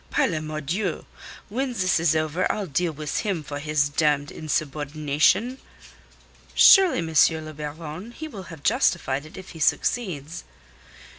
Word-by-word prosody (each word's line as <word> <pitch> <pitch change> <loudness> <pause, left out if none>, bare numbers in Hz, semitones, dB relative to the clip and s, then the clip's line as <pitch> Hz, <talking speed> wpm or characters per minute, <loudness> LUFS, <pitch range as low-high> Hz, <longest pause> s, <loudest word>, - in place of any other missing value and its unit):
Par - - +2
la 160 - -2
Mordieu! 155 +5 -3 0.4
When 255 +4 -2
this 185 -7 +1
is 165 -1 +2
over 155 +3 0
I'll 210 - -3
deal 170 +2 -1
with 150 -1 -3
him 195 -7 -2
for 145 0 -6
his 150 -1 +1
damned 145 0 0
insubordination." 155 - 0 1.0
"Surely, 385 -5 +7
M. 160 0 +3
le 155 - -8
Baron, 155 +7 -7
he 315 +6 -7
will 200 - -9
have 160 -4 -11
justified 160 - +1
it - - -14
if 190 0 -10
he 165 - -11
succeeds." 165 - -1
155 Hz, 145 wpm, -24 LUFS, 150-190 Hz, 1.0 s, Surely